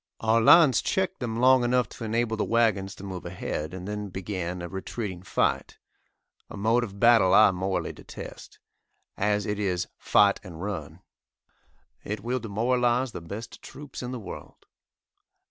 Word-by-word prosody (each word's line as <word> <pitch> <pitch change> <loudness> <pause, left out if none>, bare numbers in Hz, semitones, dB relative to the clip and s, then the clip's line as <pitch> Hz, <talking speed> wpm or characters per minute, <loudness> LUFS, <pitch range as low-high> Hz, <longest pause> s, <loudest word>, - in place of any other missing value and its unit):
Our 115 +1 +3
lines 145 0 +7
checked 190 0 -1
them 115 -3 -3
long 130 +1 +5
enough 125 -1 +2
to - - -9
enable 115 +1 0
the 110 - -1
wagons 100 -5 +1
to - - -12
move 95 -2 -6
ahead, 85 -3 -4
and 95 0 -7
then 105 -1 -4
began 90 -2 -4
a - - -4
retreating 95 0 -5
fight 95 - -1 0.7
a - - -8
mode 115 +4 +2
of 100 -3 -7
battle 115 -5 +5
I 110 -2 +7
morally 95 +1 -2
detest, - - -10 0.6
as 105 +1 0
it 105 -1 -2
is 90 -4 -1
"fight 100 -1 +4
and 85 -5 -10
run." 90 -6 -5 1.0
It 105 0 -4
will 125 +2 -2
demoralise 120 +3 0
the 90 - -7
best 100 +7 -8
troops 140 0 -9
in 125 - -5
the 130 - -4
world. 105 - -10
105 Hz, 160 wpm, -26 LUFS, 95-120 Hz, 1.0 s, lines